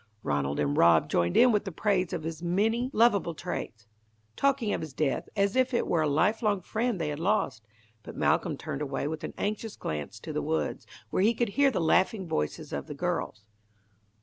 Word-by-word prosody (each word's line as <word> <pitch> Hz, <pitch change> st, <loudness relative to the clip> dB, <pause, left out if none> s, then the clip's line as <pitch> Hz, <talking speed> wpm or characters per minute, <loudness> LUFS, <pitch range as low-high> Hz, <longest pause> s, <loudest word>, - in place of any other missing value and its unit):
Ranald 70 Hz, 0 st, -1 dB
and 70 Hz, -1 st, +1 dB
Rob 85 Hz, -1 st, +4 dB
joined 85 Hz, 0 st, +1 dB
in 250 Hz, -, +7 dB
with 205 Hz, -5 st, -1 dB
praise 190 Hz, -3 st, +1 dB
of 170 Hz, -3 st, -3 dB
his 160 Hz, 0 st, -5 dB
many 220 Hz, +8 st, +1 dB
lovable 210 Hz, -, +3 dB
traits, 115 Hz, -, -5 dB, 0.5 s
talking 275 Hz, -6 st, +1 dB
of -, -, -2 dB
his 155 Hz, -4 st, -7 dB
death 150 Hz, -4 st, -1 dB
as 200 Hz, +1 st, +1 dB
if 260 Hz, -1 st, +2 dB
it -, -, +1 dB
were 165 Hz, -, +1 dB
a 155 Hz, -, +1 dB
lifelong 205 Hz, -, +1 dB
friend 225 Hz, +3 st, -1 dB
they 160 Hz, -2 st, -1 dB
had 145 Hz, 0 st, -4 dB
lost; 160 Hz, -, 0 dB, 0.3 s
but -, -, -10 dB
Malcolm -, -, +1 dB
turned 135 Hz, -, -5 dB
away 140 Hz, -1 st, -2 dB
with 155 Hz, 0 st, -5 dB
an -, -, -6 dB
anxious 215 Hz, +1 st, -3 dB
glance 75 Hz, +7 st, -5 dB
to 155 Hz, -, -6 dB
the 150 Hz, -, -1 dB
woods, 160 Hz, +2 st, -2 dB, 0.2 s
where -, -, +1 dB
he 225 Hz, +4 st, +3 dB
could 235 Hz, -1 st, 0 dB
hear 280 Hz, +6 st, +3 dB
the 260 Hz, -, -1 dB
laughing 185 Hz, +4 st, +2 dB
voices 75 Hz, -, -3 dB
of -, -, -4 dB
the -, -, -6 dB
girls. 105 Hz, -, -3 dB
175 Hz, 200 wpm, -28 LUFS, 145-215 Hz, 0.5 s, in